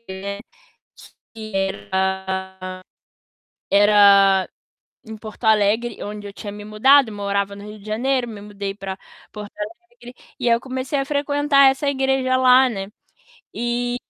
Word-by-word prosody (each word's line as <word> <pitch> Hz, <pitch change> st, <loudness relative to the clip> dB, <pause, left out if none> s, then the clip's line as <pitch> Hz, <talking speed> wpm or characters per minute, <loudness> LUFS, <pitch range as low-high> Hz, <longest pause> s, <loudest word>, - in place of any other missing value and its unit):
né, 195 Hz, +1 st, -6 dB, 1.0 s
que 215 Hz, -1 st, -9 dB
era 190 Hz, -, -1 dB, 1.5 s
era 200 Hz, -2 st, +5 dB, 0.6 s
em 220 Hz, -, -7 dB
Porto 215 Hz, +2 st, -11 dB
Alegre, 220 Hz, +2 st, +2 dB
onde 205 Hz, 0 st, -7 dB
eu 200 Hz, -, -10 dB
tinha 205 Hz, 0 st, -8 dB
me 205 Hz, 0 st, -9 dB
mudado, 245 Hz, +4 st, +4 dB
morava 200 Hz, -1 st, -2 dB
no 200 Hz, -, -11 dB
Rio 210 Hz, 0 st, -10 dB
de 200 Hz, -, -17 dB
Janeiro, 245 Hz, +3 st, -1 dB
me 210 Hz, -3 st, -9 dB
mudei 200 Hz, -1 st, -6 dB
pra 195 Hz, -1 st, -6 dB, 0.3 s
Porto 210 Hz, -1 st, -9 dB
Alegre, 245 Hz, -, -9 dB, 0.3 s
e 240 Hz, -, 0 dB
aí 230 Hz, -, +5 dB
eu 235 Hz, -, -3 dB
comecei 260 Hz, +2 st, -3 dB
a 275 Hz, -, -1 dB
frequentar 285 Hz, -1 st, +3 dB
essa 270 Hz, +2 st, -2 dB
igreja 265 Hz, -1 st, +1 dB
lá, 255 Hz, 0 st, +6 dB
né, 195 Hz, -4 st, -5 dB, 0.7 s
e 240 Hz, +1 st, -2 dB
215 Hz, 140 wpm, -21 LUFS, 200-255 Hz, 1.5 s, lá